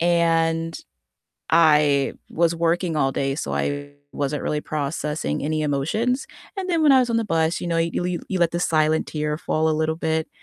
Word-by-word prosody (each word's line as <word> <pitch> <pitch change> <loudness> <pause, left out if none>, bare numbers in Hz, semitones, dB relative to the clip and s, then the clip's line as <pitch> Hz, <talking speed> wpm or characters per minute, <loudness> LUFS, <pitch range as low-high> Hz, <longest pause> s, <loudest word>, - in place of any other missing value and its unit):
and 165 -1 +1 0.7
I 150 -4 +4 0.2
was 170 0 +1
working 170 0 0
all 135 -2 +1
day, 135 0 -1
so - - -3
I 145 0 -2 0.2
wasn't 145 +1 -2
really 150 0 -1
processing 150 - -3
any 155 +1 -1
emotions. 190 - 0 0.3
And 375 -1 -4
then 335 -3 +1
when 295 -3 +6
I 265 - +7
was 245 -2 0
on 230 - +1
the 225 - -1
bus, 165 -3 0
you - - -4
know, 165 - 0
you 165 +1 0
le 180 - -1 0.2
you 190 - -1
let 170 - +3
the 170 - -1
silent 155 -1 +2
tear 150 -1 -2
fall 160 -2 0
a - - +2
little 160 0 0
bit, 160 -1 -1
160 Hz, 195 wpm, -23 LUFS, 150-170 Hz, 0.7 s, I